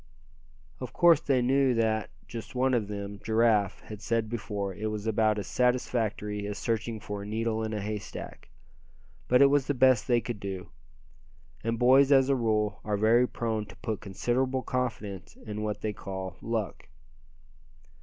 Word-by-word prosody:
Of 125 - -6
course 170 -3 +5
they 130 -3 +2
knew 135 0 +3
that, 110 -1 +1 0.2
just 115 -1 -7
as - - -15
one 130 +1 +2
of 115 -4 +1
them, 100 -1 -6
Giraffe, 110 -3 +2
had 105 -1 -10
said 115 -1 -1
before, 100 -3 -3
it 105 +4 -4
was 105 0 -4
about 110 -1 +2
as 100 - -3
satisfactory 110 -4 0
as 105 0 -4
searching 115 -1 -2
for 105 0 -6
a - - -7
needle 110 +1 -1
in 110 - -3
a 105 - -2
haystack. 105 -7 -6 0.8
But 125 +2 +6
it 140 - +6
was 145 -2 +2
the 145 - 0
best 130 -3 +4
they 120 -2 +4
could 120 -2 -5
do. 95 -2 -6 0.9
And 115 0 -1
boys 135 +3 +5
as 135 -1 +5
a 135 - +4
rule, 105 -4 0
are 105 -1 -1
very 115 +4 +4
prone 110 -4 -2
to - - -13
put 110 -2 -4
considerable 125 +6 -1
confidence 110 -7 -4
in 105 -1 -5
what 105 -1 -3
they 105 -1 -2
call 95 -3 -6
"luck." 110 -5 -3
110 Hz, 175 wpm, -28 LUFS, 105-125 Hz, 0.9 s, But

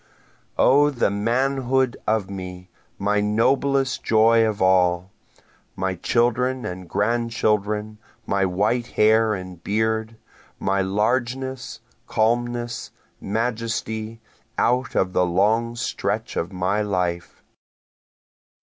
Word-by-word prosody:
O 145 +3 +5
the 135 -5 -1
old - - -3
manhood 130 +3 +1
of 110 -3 +1
me, 90 -1 -8 0.3
my 105 +1 +1
noblest 135 +5 +1
joy 115 +1 +4
of 110 -2 -1
all! 90 -1 +2 0.6
My 95 0 -1
children 120 +6 0
and 90 -1 -6
grand 115 +3 0
children, 105 -1 -1 0.3
my 100 -1 0
white 105 +6 0
hair 110 -1 +3
and 90 -2 -9
beard, 110 +1 -1 0.4
My 95 0 0
largeness, 125 +6 -1 0.3
calmness, 120 +1 -1 0.3
majesty, 110 0 -3 0.4
out 125 +2 +1
of 95 -1 +1
the 90 - +3
long 110 +7 +1
stretch 110 -2 -3
of 85 +3 -2
my 95 +3 0
life. 90 -4 -2
110 Hz, 105 wpm, -23 LUFS, 95-120 Hz, 0.6 s, O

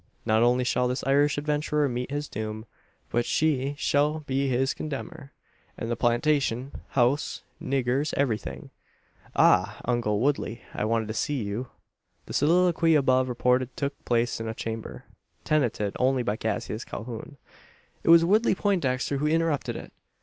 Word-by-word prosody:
Not 110 +1 +3
only 125 +1 +3
shall 125 0 +1
this 125 +1 -2
Irish 145 +2 +3
adventurer 150 0 0
meet 125 -1 -3
his 145 +1 -3
doom; 110 +1 -5 0.5
but 120 +1 +2
she 145 0 0
shall 150 +2 +1
be 135 -1 -1
his 130 +2 +1
condemner; 150 0 -6 0.5
and 115 - -4
the - - +1
plantation, 130 +1 +1 0.2
house, 130 +3 0 0.2
niggers, 135 +2 0
everything. 125 -6 -2 0.6
Ah! 100 +3 +4
uncle 115 -4 0
Woodley; 130 -3 -1
I - - -2
wanted 115 0 0
to - - -2
see 135 +2 -1
you." 105 +5 -4 0.6
The - - -8
soliloquy 165 +1 +3
above 130 -2 +3
reported 125 +1 +1
took 140 0 -1
place 120 -1 0
in 115 - -4
a 110 - -4
chamber, 115 0 -6 0.4
tenanted 120 -9 0
only 130 0 +2
by 105 -2 -1
Cassius 110 0 -3
Calhoun. 120 +5 -7 0.7
It - - 0
was 165 0 +8
Woodley 215 +4 +3
Poindexter 145 -10 0
who 150 +2 0
interrupted 160 -2 0
it. - - -9
130 Hz, 150 wpm, -26 LUFS, 120-145 Hz, 0.7 s, was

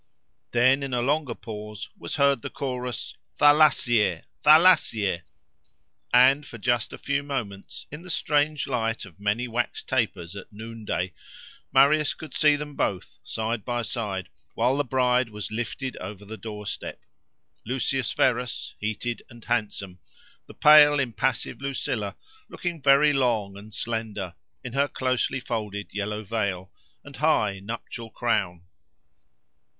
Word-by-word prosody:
Then, 130 +3 +4
in 135 -2 -2
a 120 - +1
longer 140 -2 0
pause, 105 -2 -7
was - - -5
heard 140 -3 +3
the - - -5
chorus, 125 -2 -4 0.2
Thalassie! 135 - +4 0.2
Thalassie! 150 - +5 0.9
and 130 +4 +6
for 130 -5 -10
just 120 0 0
a - - -7
few 140 0 -1
moments, 120 -9 -5
in 150 +3 -7
the 185 - -11
strange 150 -2 +1
light 115 -4 -1
of 95 -1 -16
many 105 +4 0
wax 120 +1 -2
tapers 100 -9 -1
at 100 - -9
noonday, 110 -4 -4 0.6
Marius 145 +3 +4
could 160 - -10
see 150 -1 +4
them 150 0 -6
both, 95 -3 -2
side 110 -1 -3
by 120 -1 -2
side, 105 -4 -3 0.3
while 130 - +2
the 145 - +1
bride 125 -2 +2
was 105 -1 -6
lifted 120 +3 -3
over 105 -1 -8
the 110 +2 -7
doorstep: 105 -2 -6 0.6
Lucius 130 0 -1
Verus 125 -1 0
heated 110 +3 -3
and 120 -3 -14
handsome—the 100 -5 -5
pale, 150 -1 +8
impassive 125 0 -1
Lucilla 120 -7 -2 0.3
looking 170 -3 -4
very 140 +2 +5
long 115 -7 +1
and 105 +2 -11
slender, 105 -5 -4 0.3
in 125 - -6
her 140 +1 +2
closely 130 0 0
folded 105 -5 -4
yellow 105 +1 -3
veil, 100 -3 -2 0.3
and 145 -1 -11
high 110 -10 +2
nuptial 115 +2 -7
crown. 95 -8 -1
120 Hz, 135 wpm, -26 LUFS, 105-135 Hz, 0.9 s, pale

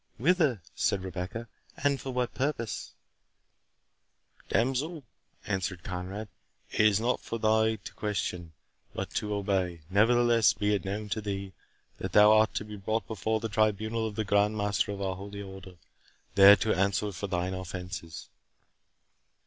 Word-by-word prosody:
"Whither," 145 - +2
said 95 -2 0
Rebecca, 95 +5 -5 0.3
"and 140 -1 +1
for 135 - -6
what 125 -1 -1
purpose?" 135 -5 -3 1.5
"Damsel," 135 +6 0 0.4
answered 95 -3 -2
Conrade, 95 +3 -5 0.4
"it - - -5
is 110 -1 +5
not 120 +3 +1
for 115 - -5
thee 110 0 +2
to 100 - -10
question, 90 -5 -3 0.4
but - - -4
to 105 - -2
obey. 95 -4 -1
Nevertheless, 115 +2 +4
be 105 0 0
it 100 - -1
known 105 +2 -3
to 110 - -2
thee, 100 -2 -4 0.5
that - - -4
thou 105 0 +8
art 110 0 +4
to 105 - -2
be 105 -1 -8
brought 110 +3 -1
before 110 +1 -1
the 115 - -3
tribunal 110 +1 +1
of 105 - -7
the 110 0 -1
Grand 105 +2 +2
Master 105 0 0
of 100 -1 -4
our 95 -1 -1
holy 100 +2 -7
Order, 95 -1 -10 0.6
there 100 +1 +9
to 110 +1 0
answer 100 +2 +1
for 100 +2 -5
thine 90 0 -1
offences." 90 -3 -6
105 Hz, 150 wpm, -29 LUFS, 95-110 Hz, 1.5 s, there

